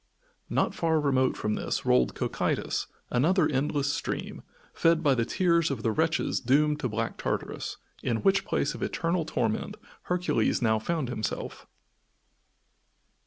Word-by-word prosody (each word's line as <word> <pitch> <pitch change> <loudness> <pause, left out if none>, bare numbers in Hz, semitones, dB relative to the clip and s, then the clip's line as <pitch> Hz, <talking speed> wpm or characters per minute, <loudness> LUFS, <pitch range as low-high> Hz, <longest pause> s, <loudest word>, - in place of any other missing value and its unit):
Not - - +1
far 160 -2 +1
remote 135 -3 +2
from 105 - -1
this - - -2
rolled 65 0 +3
Cocytus, - - -1 0.2
another 160 +7 +3
endless 140 0 0
stream, - - -4 0.3
fed 165 0 +3
by 145 -3 +4
the 115 -3 +1
tears 170 0 +2
of 130 -5 -3
the 115 - +2
wretches 160 +7 +1
doomed 150 +4 +2
to 125 - -1
Black 110 +1 -3
Tartarus, - - -3 0.2
in 115 -3 -1
which 195 0 +4
place - - 0
of - - -9
eternal 170 -1 -1
torment 110 -7 -1 0.3
Hercules 180 0 +1
now 110 -3 +2
found 155 +2 -2
himself. 110 -4 -4
145 Hz, 140 wpm, -28 LUFS, 120-165 Hz, 0.3 s, by